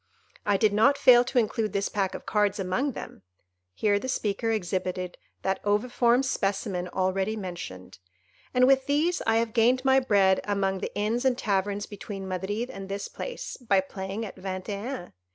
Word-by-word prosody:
"I 205 -1 +4
did 210 0 +3
not 270 +7 +4
fail 245 -3 +7
to 255 - -3
include 225 -1 +1
this 200 0 0
pack 195 -2 -1
of - - -8
cards 205 -2 +1
among 210 +9 -1
them,"—here 90 - -4
the 260 - -5
speaker 225 -2 -1
exhibited 185 -3 -2 0.3
that 190 0 0
oviform 240 +4 +2
specimen 195 -6 -1
already 190 +3 0
mentioned—"and 95 - -4
with 265 0 +4
these 310 +5 +1
I 225 - +4
have 230 -1 0
gained 250 +3 +3
my 265 0 +6
bread 200 -7 +3
among 195 -2 0
the - - -4
inns 220 +4 0
and 260 -2 +2
taverns 200 -2 -1
between 195 -1 -7
Madrid 205 +6 -3
and 195 0 -8
this 200 +1 -3
place, - - -6
by 210 -6 +2
playing 190 +3 -4
at 200 - -9
Vingt 185 0 -5
et 200 0 -3 0.2
un. 175 - -13
205 Hz, 170 wpm, -27 LUFS, 190-235 Hz, 0.3 s, fail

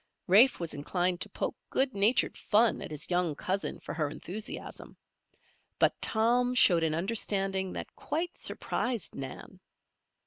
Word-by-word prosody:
Rafe 220 +8 +6
was 170 -3 -3
inclined 175 +5 -1
to - - -2
poke - - -3
good 265 -1 +1
natured 210 +5 +2
fun 220 +2 +2
at - - -6
his 155 +2 -3
young 175 -4 +1
cousin 190 +6 -3
for - - -7
her 155 -3 -1
enthusiasm; 200 +8 -6 0.8
but - - +3
Tom 245 +3 +2
showed 175 -8 +5
an 160 -1 +1
understanding 195 0 0
that - - -7
quite 330 +3 -3
surprised 240 -4 -3
Nan. 135 - -8
195 Hz, 140 wpm, -30 LUFS, 170-230 Hz, 0.8 s, Rafe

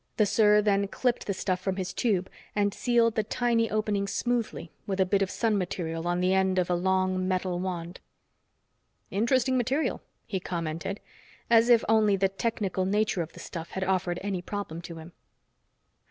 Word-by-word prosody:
The 215 - +4
Ser 210 0 +4
then 200 -1 +2
clipped 245 +4 -1
the 200 - 0
stuff 185 -1 -1
from 190 0 -2
his 185 -1 -4
tube 190 -4 0 0.3
and 205 -1 +1
sealed 235 -1 +2
the 215 - +1
tiny 230 +1 +1
opening 210 -2 0
smoothly 230 -7 -2 0.2
with 195 -1 -2
a 190 - +4
bit 195 +2 +1
of 195 - +1
sun 220 -1 +1
material 175 -3 -3
on 175 0 0
the 185 +1 +2
end 190 -1 +2
of 180 -1 +1
a - - +3
long 185 +1 +1
metal 185 -1 -1
wand. 175 -1 -4 1.1
"Interesting 255 +5 +2
material," 260 +3 0 0.2
he 190 - -3
commented, 170 +2 -4 0.5
as 230 +1 +6
if 235 -2 +6
only 215 -2 +4
the 195 0 +2
technical 195 -2 -2
nature 210 -1 +1
of 165 - -6
the - - -12
stuff 165 -2 -7
had 190 - -2
offered 185 -2 0
any 195 -3 -2
problem 180 -4 -5
to 170 -1 -8
him. 165 +2 -10
195 Hz, 180 wpm, -28 LUFS, 185-215 Hz, 1.1 s, as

